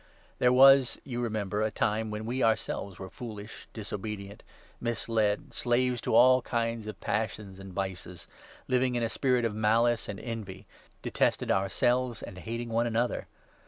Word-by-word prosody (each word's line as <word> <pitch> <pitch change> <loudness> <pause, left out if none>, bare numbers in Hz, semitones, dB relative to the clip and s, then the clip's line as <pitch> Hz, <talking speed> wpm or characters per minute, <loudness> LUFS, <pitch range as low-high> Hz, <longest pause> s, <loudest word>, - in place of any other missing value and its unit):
There 125 - +4
was, 135 0 +6
you 120 -3 -4
3 120 - 0
remember, 105 -2 -2
a 110 - +2
time 110 +1 0
when 105 +1 -4
we 125 +3 -2
ourselves 100 -4 0
were 95 0 -8
foolish, 110 -3 -8
disobedient, 105 -1 -6 0.4
misled, 115 -3 -1
slaves 125 0 +1
to - - 0
all 130 +2 +7
kinds 115 -2 -2
of 105 -3 -7
passions 105 -2 -3
and 95 -1 -9
vices, 90 -2 -5 0.4
living 125 -1 +2
in 120 - 0
a 115 - 0
spirit 125 -1 +1
of 115 - -1
malice 115 +2 +2
and 100 - -5
envy, 105 -5 -6 0.4
detested - - +1
ourselves 120 +5 +1
and 95 - -8
hating 115 +4 -5
one 115 +1 +1
another. 120 +1 -1
115 Hz, 160 wpm, -29 LUFS, 105-120 Hz, 0.4 s, all